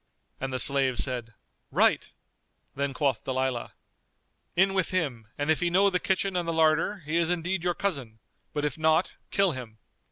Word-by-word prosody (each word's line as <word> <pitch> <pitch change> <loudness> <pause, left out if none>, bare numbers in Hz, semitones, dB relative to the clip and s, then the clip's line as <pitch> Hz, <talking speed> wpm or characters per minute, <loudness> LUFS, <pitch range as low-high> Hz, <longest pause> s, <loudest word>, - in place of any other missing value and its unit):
And 135 0 -3
the 130 - -2
slaves 135 -2 +3
said 120 -4 -4 0.3
"Right!" - - +2 0.6
Then 140 +1 -1
quoth 135 -3 0
Dalilah, 130 -2 -2 0.8
"In 190 +2 +4
with 190 -3 +1
him 140 - -2
and 145 +2 +1
if 160 - +2
he 175 - +1
know 195 +3 +4
the 180 - +1
kitchen 190 +1 0
and 175 -1 -1
the 165 - 0
larder, 160 +4 +2
he 155 +3 0
is 170 -1 +2
indeed 175 +1 -1
your 175 -1 0
cousin; 135 - -3 0.3
but, 150 -1 -2
if 150 +1 -3
not, 160 +2 +3 0.2
kill 195 -2 +2
him." 120 -6 -8
155 Hz, 180 wpm, -27 LUFS, 130-180 Hz, 0.8 s, In